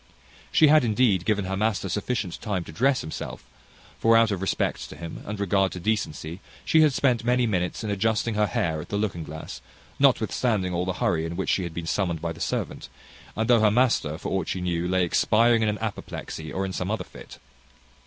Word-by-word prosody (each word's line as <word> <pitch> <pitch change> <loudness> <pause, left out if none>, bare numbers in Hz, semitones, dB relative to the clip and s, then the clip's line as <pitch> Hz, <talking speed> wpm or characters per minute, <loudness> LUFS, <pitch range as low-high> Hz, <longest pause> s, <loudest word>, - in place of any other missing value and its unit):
She 155 - +6
had 155 -1 +6
indeed 110 -5 +2
given 105 -3 +1
her 95 +1 -2
master 105 -1 0
sufficient 100 0 -3
time 100 -5 -2
to - - -10
dress 130 - +2
himself; 80 - -6 0.6
for 115 0 +5
out 115 -1 +4
of 95 -3 -2
respect 95 - -1
to - - -9
him, 85 -1 -8
and 105 0 -4
regard 95 -1 +2
to 90 - -6
decency, 85 -4 -2 0.3
she 160 - +4
had 155 -2 +5
spent 125 -3 +1
many 125 +1 +2
minutes 90 -2 -1
in 105 - -2
adjusting 110 +3 0
her 105 0 +2
hair 80 -4 -1
at - - -11
the 100 - -1
looking 100 -6 -2
glass, 75 -5 -8 0.4
notwithstanding 100 -7 +2
all 90 +1 -1
the 95 - -1
hurry 85 -3 0
in 80 +1 -4
which 95 - -2
she - - +1
had 85 - -6
been 85 - -4
summoned 85 -1 -1
by 85 +1 -3
the 80 - -12
servant, - - -3 0.5
and 110 0 -1
though 120 -2 +5
her 110 - +5
master, 110 - +2
for - - -5
aught 95 -3 -1
she 95 - -2
knew, 90 -1 -1
lay 95 0 +2
expiring 115 +6 +3
in 110 - +2
an 105 - -2
apoplexy, 100 -7 -6
or 95 +1 -2
in 95 - -5
some - - -3
other - - -1
fit. - - -13
100 Hz, 215 wpm, -25 LUFS, 85-110 Hz, 0.6 s, She